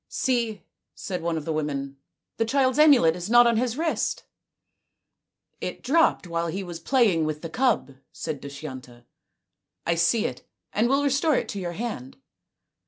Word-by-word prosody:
" - - -60 0.2
See," 235 -5 0 0.3
said 180 -2 -5
one 165 0 -1
of 155 - -5
the 160 - -2
women, 140 -3 -3 0.2
" - - -60
the 225 - +2
child's 260 +3 +1
amulet 270 - +6
is 180 +2 -6
not 240 +1 +7
on 235 -1 +3
his 245 +1 -1
wrist." 325 0 -1 0.7
" - - -52
It - - -5
dropped 320 - +3
while 170 -1 -2
he 190 +4 -3
was 175 -2 -7
playing 205 -5 +2
with 155 0 -4
the 165 - -6
cub," 230 - 0
said 155 -4 -5
Dushyanta. 130 -4 -9 0.4
" - - -58
I 170 - +2
see 170 +7 +2
it - - -4 0.3
and 225 +3 +2
will 275 +2 +2
restore 285 +2 +2
it - - -1
to 200 - -4
your 175 -2 -4
hand." 185 - -5
180 Hz, 180 wpm, -25 LUFS, 160-245 Hz, 0.7 s, not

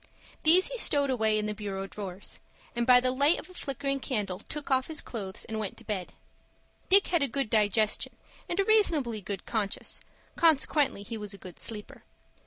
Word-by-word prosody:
These 345 +4 +6
he - - -4
stowed 285 -8 +3
away 220 -3 +2
in 210 - -1
the 210 - -2
bureau 195 -2 -5
drawers, 195 -1 -6 0.4
and 235 +1 -1
by 250 -1 +8
the 255 0 +1
light 285 +6 +3
of - - -8
a - - -14
flickering 275 -3 -3
candle 205 -9 -3
took 290 +5 -6
off 260 0 +2
his 315 -1 -1
clothes 200 -4 -6
and 220 -1 -4
went 210 -3 -4
to - - -5
bed. 195 -5 -4 0.8
Dick 395 +1 +7
had 345 -3 +2
a 280 - +2
good 270 -2 -2
digestion 215 0 +1 0.3
and 350 - -2
a - - +5
reasonably 315 - +3
good 195 0 -6
conscience; 210 -4 -2 0.3
consequently 300 -7 +3
he 225 +2 -6
was 205 -1 -5
a - - -12
good 185 -3 -12
sleeper. 210 -2 -7
235 Hz, 190 wpm, -28 LUFS, 210-285 Hz, 0.8 s, by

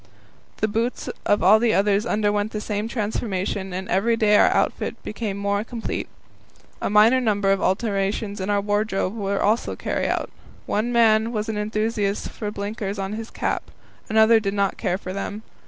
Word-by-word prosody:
The 215 - +3
boots 230 +4 -2 0.2
of 205 - +3
all 205 +4 +7
the 230 -1 +2
others 205 +2 +2
underwent 205 0 0
the 215 - -2
same 210 0 -3
transformation, 205 -4 -2
and 185 +1 -4
every 230 +5 +2
day 210 -2 +4
our - - +6
outfit - - 0
became 210 -2 -4
more 200 0 0
complete. 230 0 -4 0.7
A - - -1
number 210 -2 +4
of 195 - +2
minor - - -4
alterations 200 +1 -1
in 190 - -3
our 205 -1 +2
wardrobe 205 -1 -1
were 200 -2 -1
also 215 +3 +1
carried - - -2
out. - - -2 0.3
One 220 +4 -1
man 225 -1 +4
was 215 -1 -2
an 215 - -2
enthusiast 215 -1 -1
for 210 - -5
blinkers 205 0 -4
on 195 +1 -3
his 225 +1 -6
cap; - - -3 0.4
another 220 +1 +5
did 200 -2 -2
not 200 -1 +1
care 185 -4 -1
for 185 -1 -7
them. 200 +2 -5
210 Hz, 175 wpm, -23 LUFS, 200-220 Hz, 0.7 s, all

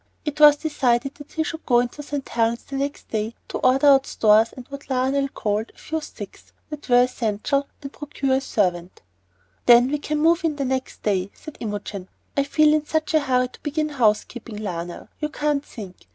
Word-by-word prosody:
It 300 0 -4
was 295 -1 +9
decided 275 -4 0
that 290 0 -14
he 320 - 0
should 320 0 -6
go 240 -2 +5
into 245 +4 -3
St. 285 -1 -5
Helen's 235 +2 -1
next 280 +1 -4
day 220 +1 -2
to - - -3
order 265 +3 +3
out 275 -1 +6
stores 215 +1 +4
and 255 -1 -11
what 280 0 -9
Lionel 265 +2 +1
called 215 -4 -2
"a - - -32
few 320 0 -4
sticks" - - -11 0.2
that 295 -2 -8
were 245 0 +6
essential, 250 +3 -1 0.2
and 275 - -7
procure 275 -3 -1
a - - -2
servant. 180 -8 -1 0.6
"Then 245 +2 +7
we 295 - 0
can 300 +1 -2
move 330 +3 +3
in 320 -2 0
the 280 -1 -2
next 260 0 -3
day," 195 -2 0
said 310 - -11
Imogen. 205 -3 -5 0.3
"I 280 - +2
feel 305 +1 +4
in 305 -1 +2
such 315 0 -1
a 315 - +5
hurry 255 -3 +1
to - - -16
begin 305 +1 -1
house 230 -7 +2
keeping, 235 -2 -10
Lionel, 175 -4 -5
you 300 - -2
can't 295 -2 -1
think. 200 -10 -11
265 Hz, 200 wpm, -23 LUFS, 225-295 Hz, 0.6 s, was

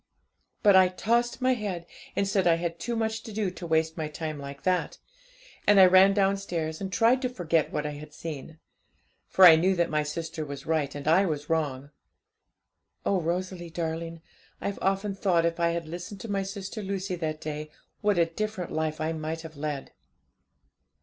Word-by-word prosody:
But 205 -3 +7
I 185 -1 +7
tossed 235 +7 0
my 255 0 +4
head, 200 -7 -4 0.3
and 200 - +1
said 195 -2 +2
I 170 - +5
had 170 0 -3
too 240 - -3
much 220 0 -1
to 225 - -9
do 205 -3 -1
to 180 -1 -8
waste 160 0 +1
my 155 -2 -2
time 155 0 -5
like 140 0 -8
that; 185 -1 0 0.7
and 205 -1 +7
I 190 - +10
ran 190 +2 +6
downstairs, 195 -5 0
and 190 -1 -4
tried 235 +6 +3
to 255 - 0
forget 170 - 0
what 150 - -2
I 150 - -2
had 150 +1 -9
seen; 155 0 -7 0.7
for 190 - +6
I 165 -2 +11
knew 185 +4 +2
that 170 -1 +1
my 150 0 +2
sister 160 +1 -4
was 140 -2 -7
right 155 -3 0
and 145 0 -6
I 185 +5 +5
was 150 -1 -3
wrong. 145 -3 -1 1.1
Oh, 195 -2 +2
Rosalie 175 +1 -3
darling, 165 0 -4 0.4
I've 200 - -3
often 195 +1 0
thought 185 -4 +2
if 170 0 -1
I 170 0 +3
had 170 -1 -3
listened 180 +4 -7
to 225 - -5
my 200 -1 0
sister 195 +2 -5
Lucy 195 -1 -3
that 155 -2 -3
day, 155 0 -5 0.3
what 205 -3 +2
a 170 - +5
different 185 +2 -4
life 155 0 -2
I 160 +1 -1
might 160 +1 -4
have 160 -1 -10
led! 145 -1 -4
170 Hz, 190 wpm, -27 LUFS, 155-195 Hz, 1.1 s, I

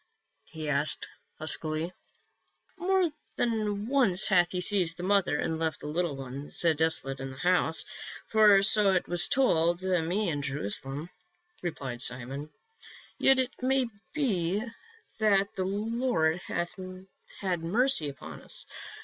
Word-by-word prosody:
he 155 -1 -6
asked 150 +1 +2 0.3
huskily. 155 +2 -2 0.4
" - - -38
More 375 0 +2 0.3
than 215 -3 -1
once 240 -8 +4
hath 175 -3 +4
he 180 - -2
seized 180 -3 +2
the 175 - -6
mother 190 -5 +2
and 160 +1 -2
left 160 -1 -1
the - - -10
little 160 0 -1
ones 135 +1 -6 0.2
desolate 150 -4 0
in 135 0 -5
the 130 - -10
house 175 0 +1 0.2
— - - -11
for 210 -3 +6
so 205 -1 +5
it 185 - 0
was 175 -1 +2
told 175 -9 +2
me 185 +2 0
in 145 -3 -2
Jerusalem," 140 - -4 0.5
replied 135 -8 -5
Simon. 130 +4 -2 0.7
"Yet 270 - +5
it 260 0 0
may 260 -1 +1 0.2
be 205 - 0 0.6
that 200 -2 +2
the 185 - -1
Lord 205 -5 0
hath 175 0 -2 0.7
had 185 -3 0
mercy 210 - +2
upon 135 -2 -10
us. - - -4
175 Hz, 140 wpm, -29 LUFS, 155-210 Hz, 0.7 s, for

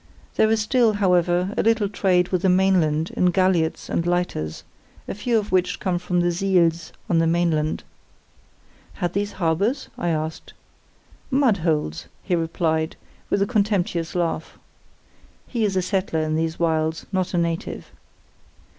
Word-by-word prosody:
There 220 - +4
is 225 0 +2
still, 225 0 +3
however, 180 -1 +2
a - - +2
little 225 -2 +2
trade 185 -3 +1
with 185 -2 0
the 190 - +3
mainland 180 -4 +2
in 180 - +1
galliots 180 -3 +1
and - - -1
lighters, 175 - -2 0.4
a - - -3
few 230 +3 0
of 210 -1 -2
which 185 -1 +1
come 180 -2 -1
from 175 0 0
the 175 0 +2
'siels' 170 -3 +1 0.2
on 170 - +2
the 165 - +2
mainland. 165 -2 0 1.1
'Had 175 -2 -3
these 205 +1 -2
harbours?' 195 - 0
I 175 - 0
asked. 155 0 -3 0.8
'Mud 260 -6 +3
holes!' 155 - -1 0.2
he 185 - -2
replied, 160 -1 -1 0.3
with 200 - +2
a - - +1
contemptuous 200 -6 0
laugh. 165 -2 -2 0.9
(He 235 -3 -2
is 195 -2 -1
a 185 - +1
settler 185 -4 -1
in 155 0 -1
these 160 +1 -1
wilds, 160 -1 0
not 185 -1 -1
a - - +2
native.) 170 -1 -3
180 Hz, 155 wpm, -23 LUFS, 165-195 Hz, 1.1 s, There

